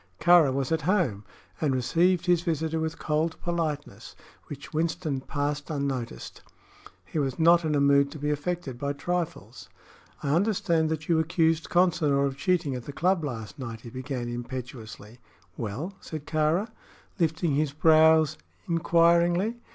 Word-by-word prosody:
Kāra 170 -4 +6
was 135 +1 -2
at 160 - +1
home 145 - 0 0.4
and 145 -4 +1
received 175 +8 +2
his 175 -2 +3
visitor 160 -1 -1
with 160 0 -3
cold 155 +2 -1
politeness, 160 -4 -3 0.3
which 145 +1 -9
Winston 155 -3 -1
passed 145 +1 -3
unnoticed. 140 -5 -4 0.6
He 155 - -3
was 135 -3 -1
not 170 +1 +5
in 155 -2 0
a - - +2
mood 140 0 +4
to 155 - -9
be 150 0 -1
affected 150 -4 -3
by 140 +1 -2
trifles. 175 +3 -4 0.5
"I 140 - -1
understand 170 -4 +1
that 155 -1 -4
you 165 -2 +3
accused 165 0 +1
Consinor 160 -6 +2
of 135 -1 -2
cheating 175 -2 0
at 125 -2 -6
the - - -6
club 180 +3 +1
last 120 -1 -6
night," 115 -3 -6
he 115 - -10
began, 130 -1 -5
impetuously. 120 -2 -7 0.4
"Well?" 125 - -5
said 155 -2 -8
Kāra, 160 +8 0 0.5
lifting 160 -1 +1
his 145 0 +1
brows 155 0 +4 0.3
inquiringly. 170 +5 +3
155 Hz, 150 wpm, -27 LUFS, 140-170 Hz, 0.6 s, Kāra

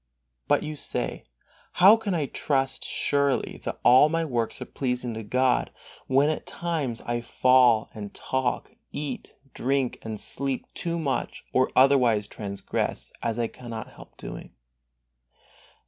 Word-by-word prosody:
But - - +3
you 155 0 -4
say: - - -3 0.5
How 195 +4 +8
can 220 -5 -2
I 155 -4 0
trust 135 -1 -1
surely 140 -2 0
that - - -4
all 130 +5 +7
my 165 +1 0
works 120 -6 -2
are - - -5
pleasing 125 -2 -3
to 110 - -5
God, 125 +4 +1 0.4
when 140 +3 +4
at 155 - -5
times 155 -9 -3
I 120 0 -2
fall, 125 -2 +4
and 105 -2 -7
talk, 130 -2 -2 0.2
eat, 145 -3 -5 0.2
drink 135 0 0
and 110 -2 -6
sleep 135 -1 -2
too 170 0 -2
much, 145 -5 -2
or 130 0 +3
otherwise 125 -6 +5
transgress, 100 -1 -4
as 115 -1 -1
I 120 - +1
cannot 115 -1 -7
help - - -15
doing? - - -9
130 Hz, 140 wpm, -26 LUFS, 120-145 Hz, 0.5 s, How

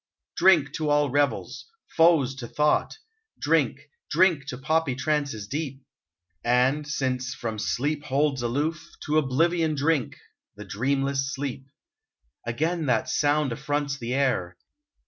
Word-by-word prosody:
Drink 165 -6 +4
to 155 -2 -1
all 145 -2 +2
revels 145 +1 -1
— - - -27
foes 160 -6 +4
to 120 -3 -6
thought! 150 +5 +1 0.4
Drink, - - +1 0.3
drink 170 -7 +3
to 125 - -5
poppy 155 0 0
trances 140 -6 -1
deep! 140 0 -4 0.6
And 130 +5 +2
since 130 -3 -2
from 110 -2 -4
some - - -3
sleep 145 +3 -1
holds 140 -1 +1
aloof. 145 +7 -1 0.2
To 155 +1 +3
oblivion 160 +3 +1
drink! 145 -2 0 0.2
— - - -60
the 105 - -8
dreamless 135 +6 -1
sleep. 135 -1 -5 0.8
Again 160 +6 -1
that 120 -3 +1
sound 145 -2 +1
affronts 145 +2 -2
the 120 +1 -3
air 95 -11 0
140 Hz, 135 wpm, -26 LUFS, 130-150 Hz, 0.8 s, Drink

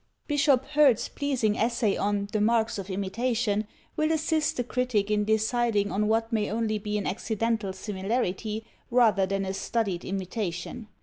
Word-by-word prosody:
Bishop 280 -3 +3
Hurd's 285 -6 +4
pleasing 255 -7 0
essay 230 -2 +1
on 200 0 0
"The 215 - 0
Marks 225 0 +2
of 195 0 -6
Imitation" 210 +2 -1 0.3
will 310 0 +1
assist 315 -1 +1
the 245 - +1
critic 240 -4 0
in 210 0 +2
deciding 220 -1 +1
on 210 +2 +1
what 225 +1 +1
may 210 -2 +1
only 215 -1 -1
be 210 0 -2
an 205 - -3
accidental 220 0 -1
similarity, 210 +2 -2 0.2
rather 225 -6 +4
than 195 0 -1
a 190 - -2
studied 195 -3 -1
imitation. 195 +2 -4
220 Hz, 150 wpm, -27 LUFS, 200-240 Hz, 0.3 s, Hurd's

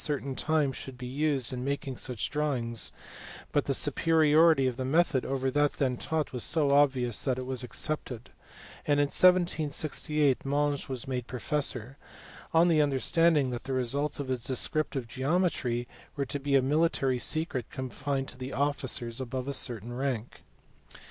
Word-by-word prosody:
certain 140 -2 -2
time 155 -2 +1
should 130 0 -8
be 125 - -7
used 135 -1 -1
in 125 0 -4
making 140 -1 -3
such 125 -2 -3
drawings, 130 -7 0 0.6
but - - +1
the - - -1
superiority 160 -2 +4
of 130 -2 0
the 130 - -4
method 140 -1 +2
over 135 0 -1
that 145 +1 +2
then 130 -3 0
taught 155 +4 -2
was 125 - -1
so 150 -3 +3
obvious 135 -5 +3
that 130 -2 0
it 130 - -4
was 130 -1 -2
accepted; 125 -2 -3 0.6
and 145 -1 +3
in - - +5
1768 155 -4 +2
Monge 145 0 -1
was 130 +1 -4
made 125 -2 -3
professor, 130 0 -2 0.5
on 165 +1 +5
the 160 -3 +4
understanding 145 0 +2
that 120 - -6
the 135 - -3
results 140 +4 -1
of 140 -2 -4
his 125 -2 -2
descrip 135 +4 0
tive 130 -5 -5
geometry 130 -3 -1 0.3
were 140 -2 -1
to 145 - -4
be 140 0 0
a 135 - +4
military 135 -3 +1
secret 155 -4 0
confined 135 +1 -3
to 130 +1 -6
officers 130 -4 -1
above 130 +1 -4
a 140 - -2
certain 120 -3 -2
rank. 125 -3 -3
135 Hz, 160 wpm, -29 LUFS, 125-150 Hz, 0.6 s, in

